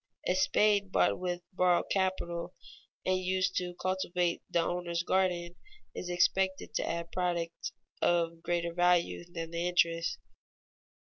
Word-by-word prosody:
A - - +3
spade 200 +1 +3
bought - - +3
with 180 -1 -3
borrowed 180 -1 +2
capital 185 -2 -1 0.5
and 185 0 +2
used 185 0 0
to 180 -1 -2
cultivate 180 -2 0
the - - +2
owner's 170 0 -1
garden 180 -2 +1 0.4
is 180 - -5
expected 190 +2 +1
to - - -1
add 170 0 -3
products 175 -2 -2 0.3
of 170 -1 +1
greater 170 0 -1
value 175 0 +2
than 165 -1 -5
the 170 +1 -1
interest. 170 -1 +2
175 Hz, 130 wpm, -31 LUFS, 170-185 Hz, 0.5 s, A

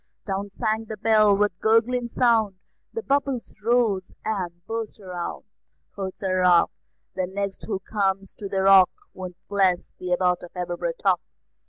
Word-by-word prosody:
Down 200 0 -3
sank 220 +1 -2
the 220 - -6
bell, 215 -1 +4
with 210 0 +3
a - - -45
gurgling 235 +2 +3
sound, 225 -5 +2 0.4
The 455 - -4
bubbles 275 - -1
rose 225 -5 +2
and 180 -5 -3
burst 225 0 -4
around; 180 -3 -5 0.5
Quoth 190 -2 -5
Sir 185 -1 0
Ralph: 180 -2 +5 0.4
"The 185 -1 -1
next 195 +1 -4
who 200 -3 -2
comes 195 -1 -1
to 200 - -5
the 190 -1 0
Rock 195 -1 +8 0.2
Won't 180 -2 -7
bless 190 -3 +1
the 180 0 -4
Abbot 180 0 +2
of 175 - -11
Aberbrothock." 175 +1 0
195 Hz, 155 wpm, -25 LUFS, 185-220 Hz, 0.5 s, Rock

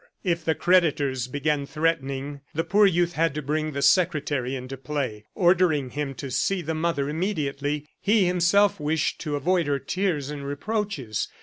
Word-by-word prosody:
If 170 -4 0
the 160 0 +1
creditors 145 -8 +2
began 145 +1 -1
threatening, 145 -3 -2
the 165 - +1
poor 200 +5 +4
youth 175 -1 +1
had 165 -2 +1
to 150 - -2
bring 155 +2 -1
the 140 0 -2
secretary 145 -5 +2
into 130 +1 -6
play, 130 -6 -4
ordering 175 -7 +3
him 145 -2 -3
to 135 +1 -6
see 180 +8 0
the 160 +1 -2
mother 155 -3 -1
immediately; 150 -4 -2
he 205 -1 +3
himself 180 +3 +3
wished 150 0 -1
to 150 -1 -2
avoid 170 +2 +1
her 140 -1 +1
tears 155 -3 -2
and 145 -1 -6
reproaches. 145 - -3
150 Hz, 165 wpm, -25 LUFS, 140-175 Hz, -, poor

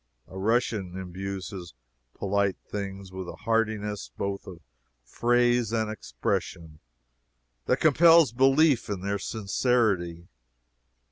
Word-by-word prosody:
A - - -13
Russian 100 -2 0
imbues 95 +1 -5
his 90 -9 -9 0.4
polite 100 -1 0
things 100 -2 -6
with 95 -1 -6
a - - -7
heartiness, 110 -2 -1
both 100 0 -4
of 90 -3 -9 0.5
phrase 120 - +2
and 110 -2 0
expression, 80 -6 -4 0.9
that 125 - +3
compels 165 -1 +6
belief 135 +1 +3
in 100 -3 -3
their 100 +1 -2
sincerity. 100 -5 0
100 Hz, 110 wpm, -27 LUFS, 95-120 Hz, 0.9 s, compels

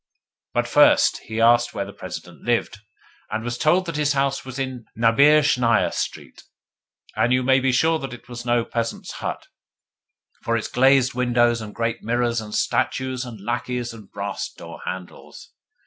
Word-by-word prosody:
But - - +1
first - - +5
he 110 0 -4
asked 120 +1 +4
where 100 - -2
the 100 - -10
President - - -9
lived, - - -1 0.5
and 110 +1 -3
was 120 0 -3
told 175 +8 +2
that 165 -3 -4
his 150 -1 +2
house 140 0 0
was 130 0 -8
in 130 -3 -4
Naberezhnaia 125 0 +4
Street. - - -5 0.7
And 120 - +2
you 125 0 +3
may 130 +1 +4
be 130 0 +1
sure 160 +6 +2
that 135 -3 -6
it 120 -1 -11
was 120 0 -7
no 120 -1 +1
peasant's 115 -1 -4
hut, - - -5 1.0
with 115 0 +2
its 110 - -3
glazed 130 0 +4
windows 120 -1 +2
and 105 -1 -8
great 115 0 -2
mirrors 120 0 0
and 105 -1 -7
statues 130 -1 -1
and 115 -4 -9
lacqueys 120 +2 -3
and 110 -4 -13
brass 100 0 -4
door - - -11
handles! 95 -1 -8
120 Hz, 165 wpm, -23 LUFS, 115-130 Hz, 1.0 s, first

